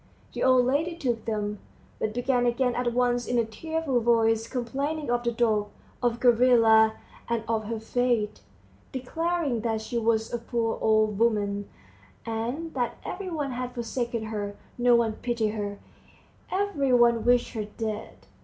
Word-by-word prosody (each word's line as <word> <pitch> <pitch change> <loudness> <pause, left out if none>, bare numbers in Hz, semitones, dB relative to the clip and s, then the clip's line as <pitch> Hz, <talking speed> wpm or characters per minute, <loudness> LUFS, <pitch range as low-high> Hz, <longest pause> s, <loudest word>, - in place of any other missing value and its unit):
The - - -5
old 255 -1 +5
lady 305 +7 0
took 240 -8 -2
them, 210 -2 -2 0.4
but 215 - -1
began 245 0 +1
again 245 +1 +1
at 245 0 0
once 245 0 +1
in 245 - 0
a 230 - +3
tearful 300 +4 -2
voice 225 -1 +2
complaining 275 +4 -2
of 240 0 +1
the 235 - +1
dog, 220 -3 +1 0.3
of 240 -1 +1
Gavrila, 230 -3 +5 0.4
and 230 -1 0
of 220 -1 0
her 225 +1 -3
fate, 230 -2 0 0.5
declaring 295 0 -1
that 225 -1 -1
she 225 +2 -2
was 225 0 +1
a 240 - -1
poor 230 -1 -2
old 215 -2 +2
woman, 205 -3 +1 0.6
and 240 +9 -3
that 245 -3 -2
every 380 0 -5
one 295 -5 -2
had 250 0 -4
forsaken 235 -1 -2
her, 205 -2 -4 0.2
no 245 0 +4
one 230 -2 +2
pitied 235 -3 0
her, 205 -2 -4 0.7
every 370 -9 0
one 235 -2 +4
wished 245 0 +3
her 215 -3 -3
dead. 215 0 -6
235 Hz, 155 wpm, -27 LUFS, 220-250 Hz, 0.7 s, old